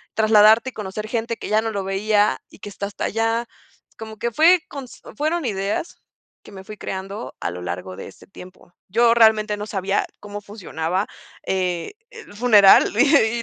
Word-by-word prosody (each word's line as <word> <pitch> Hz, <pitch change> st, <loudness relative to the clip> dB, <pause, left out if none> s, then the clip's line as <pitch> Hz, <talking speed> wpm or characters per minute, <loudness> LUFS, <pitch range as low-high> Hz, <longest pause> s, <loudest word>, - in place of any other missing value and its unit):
trasladarte 220 Hz, +3 st, +5 dB
y -, -, -34 dB
conocer 210 Hz, +1 st, -6 dB
gente 230 Hz, 0 st, -3 dB
que -, -, -7 dB
ya 215 Hz, +1 st, +3 dB
no 225 Hz, 0 st, -3 dB
lo 200 Hz, -2 st, -3 dB
veía 205 Hz, +2 st, +1 dB
y -, -, -18 dB
que -, -, -9 dB
está 200 Hz, 0 st, -5 dB
hasta 200 Hz, -, -5 dB
allá, 225 Hz, +2 st, -1 dB, 0.5 s
como 220 Hz, -1 st, -9 dB
que 235 Hz, +2 st, -3 dB
fue 340 Hz, +6 st, +5 dB
cons 275 Hz, -4 st, -10 dB
fueron 310 Hz, +4 st, -1 dB
ideas 200 Hz, -, -3 dB, 0.4 s
que -, -, -14 dB
me 190 Hz, -1 st, -10 dB
fui 210 Hz, +2 st, -10 dB
creando 195 Hz, +4 st, -6 dB
a 85 Hz, -, -2 dB
lo 90 Hz, 0 st, -8 dB
largo 90 Hz, +1 st, -6 dB
de -, -, -8 dB
este -, -, -15 dB
tiempo. 180 Hz, -2 st, -15 dB
Yo 230 Hz, +4 st, +3 dB
realmente 220 Hz, -2 st, +3 dB
no 210 Hz, +1 st, -6 dB
sabía 195 Hz, -1 st, -1 dB, 0.2 s
cómo 205 Hz, 0 st, -7 dB
funcionaba, 190 Hz, -3 st, -3 dB, 0.4 s
eh, 180 Hz, -, -2 dB, 0.2 s
el 460 Hz, -, -13 dB
funeral, 210 Hz, -4 st, +6 dB
y 240 Hz, -4 st, +3 dB
210 Hz, 180 wpm, -21 LUFS, 195-230 Hz, 0.5 s, funeral